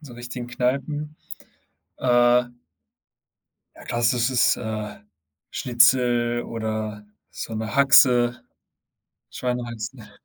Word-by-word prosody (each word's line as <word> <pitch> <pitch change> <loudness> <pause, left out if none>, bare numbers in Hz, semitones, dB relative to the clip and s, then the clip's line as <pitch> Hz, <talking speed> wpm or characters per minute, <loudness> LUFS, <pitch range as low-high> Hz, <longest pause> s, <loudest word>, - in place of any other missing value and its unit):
so 135 -6 -12
richtigen 120 0 -7
Kneipen. 140 +5 -2 0.8
Äh 120 0 +4 1.3
Ja, - - -14
klassisches, 120 +1 +2
äh, 110 -2 -6 0.5
Schnitzel 120 -1 +2
oder 110 -2 -4 0.3
so 115 - -7
'ne 110 0 -4
Haxe, 125 -3 +5 0.9
Schweinehaxe. 120 -2 -5
120 Hz, 75 wpm, -23 LUFS, 115-125 Hz, 1.3 s, Haxe